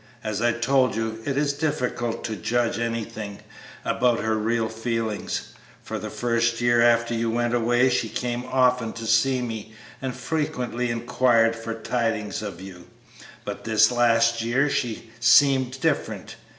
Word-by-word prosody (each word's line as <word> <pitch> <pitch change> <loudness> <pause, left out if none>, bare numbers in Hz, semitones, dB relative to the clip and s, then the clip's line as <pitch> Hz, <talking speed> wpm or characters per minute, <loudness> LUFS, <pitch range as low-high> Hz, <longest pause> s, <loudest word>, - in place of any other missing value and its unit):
As 110 -1 -2
I 120 0 +3
told 125 +1 +2
you, 110 0 -3
it 140 -1 -1
is 145 0 +1
difficult 125 -6 -2
to 110 - -3
judge 120 +1 0
anything 110 -3 -4 0.5
about 120 -2 +2
her 110 0 0
real 110 +1 0
feelings. 115 -1 -3 0.3
For - - -5
the - - -5
first 115 -1 0
year 120 -1 +3
after 120 0 +3
you 115 0 0
went 120 +1 0
away 120 +2 +3
she 115 -2 0
came 120 +1 -3
often 125 -3 +2
to 115 - -7
see 125 +3 +2
me 110 -2 -6 0.3
and 130 -2 -3
frequently 125 -4 -2
inquired 115 -1 +2
for 115 0 -5
tidings 110 -3 -2
of 105 -2 -6
you, 90 -2 -11 0.6
but - - -6
this 110 0 +4
last 115 -1 +3
year 130 +5 +1
she 120 -4 0
has - - -13 0.2
seemed 130 +2 +4
different. 160 -3 -1
115 Hz, 155 wpm, -24 LUFS, 115-125 Hz, 0.6 s, this